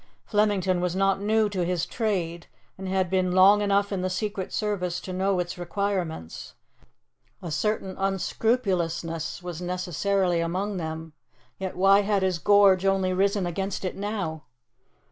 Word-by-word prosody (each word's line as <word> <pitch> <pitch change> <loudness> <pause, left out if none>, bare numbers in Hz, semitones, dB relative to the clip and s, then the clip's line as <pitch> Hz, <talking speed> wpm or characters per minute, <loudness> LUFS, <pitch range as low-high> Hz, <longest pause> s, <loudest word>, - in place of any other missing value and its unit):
Flemington 200 -4 +1
was 180 0 -1
not 195 0 +2
new 215 +1 +2
to 190 -3 -1
his 175 -1 -1
trade, 175 -7 -2 0.3
and 190 0 -7
had 190 -1 +1
been 185 0 +1
long 195 +3 +6
enough 200 0 +1
in 195 -2 -1
the 185 - -1
secret 195 0 -3
service 180 -5 -1
to 185 - -7
know 190 +1 +1
its 175 0 -3
requirements. 175 - -3 0.8
A 175 -4 -6
certain 195 +2 -1
unscrupulousness 180 -5 -1
was 175 -1 -6
necessarily 180 +1 0
among 185 +4 -2
them, 160 -1 -5 0.5
yet 190 -1 -4
why 195 +2 +5
had 200 -1 +1
his 185 -2 0
gorge 200 -1 +5
only 195 -1 +2
risen 195 +1 +1
against 190 +3 -3
it 185 - -3
now? 195 -7 -4
190 Hz, 145 wpm, -26 LUFS, 175-200 Hz, 0.8 s, long